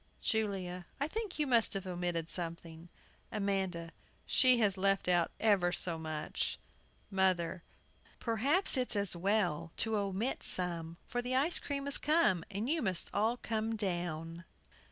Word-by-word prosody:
JULIA. 190 -5 -2
I 285 - 0
think 425 +2 -5
you 300 - 0
must 235 -5 +4
have 195 -1 -4
omitted 175 -2 -3
something. 165 -1 -3 0.4
AMANDA. 190 -5 -2 0.3
She 255 -1 +4
has 205 -4 +2
left 195 0 0
out 175 -2 +2
ever 195 -5 +2
so 170 -2 +1
much! 155 -1 -4 0.5
MOTHER. 185 -2 0 0.6
Perhaps 270 - +2
it's 250 -3 0
as 200 -3 +1
well 175 -4 -1
to 220 -1 +2
omit 200 +5 -2
some, 170 -2 +3
for 245 - -3
the 250 +1 -2
ice 295 +6 +2
cream 280 -1 -4
has 280 - +6
come, 300 - +2
and 205 +4 -4
you 320 +3 0
must 185 -6 0
all 225 +4 +1
come 225 -1 -3
down. 175 -4 -3
195 Hz, 145 wpm, -32 LUFS, 175-230 Hz, 0.6 s, has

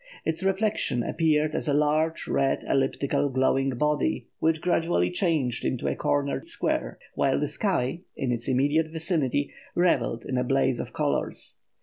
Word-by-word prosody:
Its 160 +1 -1
reflection 195 - +1
appeared 155 0 +1
as - - -2
a 145 - +2
large 155 +2 +1
red 135 -1 +1
elliptical 135 +1 +1
glowing 135 +1 +2
body 150 +4 0
which 160 0 +2
gradually 175 0 +1
changed 160 - 0
into 130 - -1
a - - 0
cornered 145 - -1
square, 335 - -1 0.2
while - - +1
the - - 0
sky, 170 - -1 0.2
in 130 -2 -1
its 120 -1 -3
immediate 145 +5 +2
vicinity, 155 -4 -1 0.2
revelled 175 -9 +1
in 130 - -1
a - - +1
blaze 135 -1 +1
of - - -5
colours. - - -2
150 Hz, 150 wpm, -26 LUFS, 135-165 Hz, 0.2 s, a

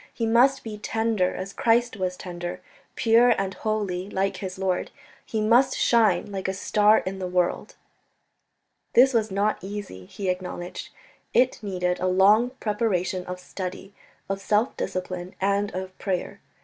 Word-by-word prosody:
He 230 - -2
must 255 +4 +4
be 215 -2 -7
tender 220 -4 0
as 190 +1 -6
Christ 235 0 +2
was 185 -2 -2
tender, 175 -1 -6 0.4
pure 235 +1 +5
and 195 -1 -2
holy 200 -4 -2
like 195 0 -1
his 190 -2 -6
Lord; 190 -1 -1 0.3
he 220 - -3
must 245 +5 +4
shine 225 -3 +3
like 190 -1 -3
a 190 - -2
star 210 +2 +4
in 190 +1 -4
the 185 - -3
world." 180 -1 -1 1.2
This 260 +2 +6
was 220 -2 +1
not 200 0 0
easy, 190 - -7
he 200 - -6
acknowledged; 180 -1 -5 0.5
it 250 0 +3
needed 180 -3 -1
a 185 - 0
long 200 +6 +5
preparation 190 -4 -1
of 180 0 -5
study, 185 +1 -7 0.3
of 195 0 -3
self 210 +5 +1
discipline 180 0 -4
and 200 +1 +1
of 185 0 -5
prayer. 185 -3 -3
195 Hz, 150 wpm, -25 LUFS, 185-220 Hz, 1.2 s, This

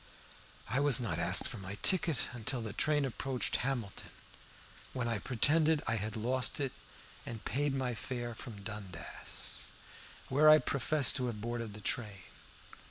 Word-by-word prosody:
I 135 - +1
was 145 -2 +4
not 120 -3 -2
asked - - +5
for - - -6
my 95 +1 -5
ticket 170 -6 +3
until 120 +1 -3
the 110 -2 -5
train 150 -2 +2
approached 130 0 -1
Hamilton, 120 -6 -3 0.8
when 125 -3 -1
I 115 -2 0
pretended 150 +8 +4
that - - -5
I - - +2
had 105 0 -3
lost 125 +5 0
it, 135 -3 -1 0.5
and 115 -3 -7
paid 145 +1 0
my 130 -2 -1
fare 120 +2 -4
from 110 -3 -9
Dundas, 100 -6 -5 0.6
where 150 +4 +5
I 155 - +10
professed 145 0 +2
to 125 -2 0
have 110 -3 -4
boarded 115 -1 -4
the 105 - -10
train. 105 -2 -2
125 Hz, 160 wpm, -33 LUFS, 110-135 Hz, 0.8 s, I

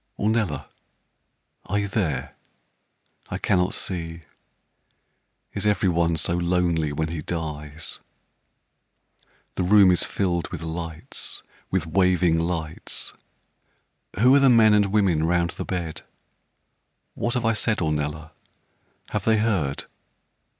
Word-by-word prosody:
Ornella, 105 - 0 1.0
are 100 - -1
you 100 0 0
there? 95 - -2 0.9
I - - -3
cannot 90 0 +1
see 85 -2 -4 1.3
Is - - -2
every 105 -2 +2
one 85 -1 +1
so 85 - 0
lonely 85 -3 +1
when 80 +2 -2
he 80 -1 -4
dies? 75 -1 -5 1.5
The - - -2
room 95 +1 +6
is 90 - +2
filled 85 -4 -1
with 85 -2 -7
lights 80 -1 -5 0.3
with 95 -3 0
waving 90 -1 +3
lights 80 -2 -4 1.1
Who 125 +4 +6
are 140 - +7
the 135 -1 +5
men 115 -3 +6
and 105 -1 +4
women 95 -6 +2
'round 85 +1 +1
the - - -6
bed? 85 -4 -4 1.1
What 120 +1 -2
have 120 -2 0
I 115 - +3
said, 110 0 0
Ornella? 75 0 -2 0.8
Have 105 -2 -2
they 110 -1 +4
heard? 95 -11 0
85 Hz, 120 wpm, -24 LUFS, 80-100 Hz, 1.5 s, are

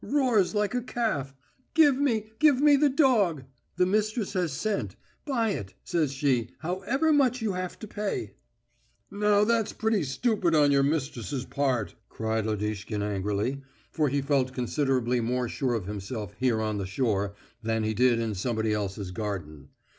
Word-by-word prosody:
Roars 245 -9 +2
like 210 0 +1
a 250 - 0
calf: 215 - -2 0.4
'Give 300 -4 +6
me, 225 -6 0
give 295 -4 +5
me 295 0 +6
the 290 +1 +4
dog....' 225 - +3 0.3
The 180 - +3
mistress 215 +2 0
has 180 -4 0
sent. 205 +9 -2 0.3
'Buy 230 -6 +1
it,' 95 - -5
says 160 -5 0
she, 135 -4 0
'however 200 - 0
much 255 -3 +3
you 220 -3 -1
have 185 0 -4
to 215 - -8
pay.'" 205 0 -3 0.8
"Now 205 0 +3
that's 225 -1 +1
pretty 220 -2 +1
stupid 170 - +1
on 145 -2 +5
your 140 -1 +4
mistress's 135 -3 -2
part," 130 -6 -1 0.2
cried 110 -1 -2
Lodishkin 105 0 -2
angrily, 105 +6 -1 0.3
for 150 -3 +1
he 140 +1 0
felt 135 -2 +1
considerably 125 -1 0
more 125 +2 -1
sure 125 0 -1
of 105 -5 -3
himself 105 +1 -5
here 125 -3 +2
on 110 -1 -1
the 95 - -3
shore 100 -2 -1 0.3
than 110 0 -1
he 110 0 0
did 125 +1 +3
in 115 -2 -1
somebody 110 +2 -1
else's 100 -2 -3
garden. 90 -9 -5
140 Hz, 160 wpm, -27 LUFS, -, 0.8 s, Give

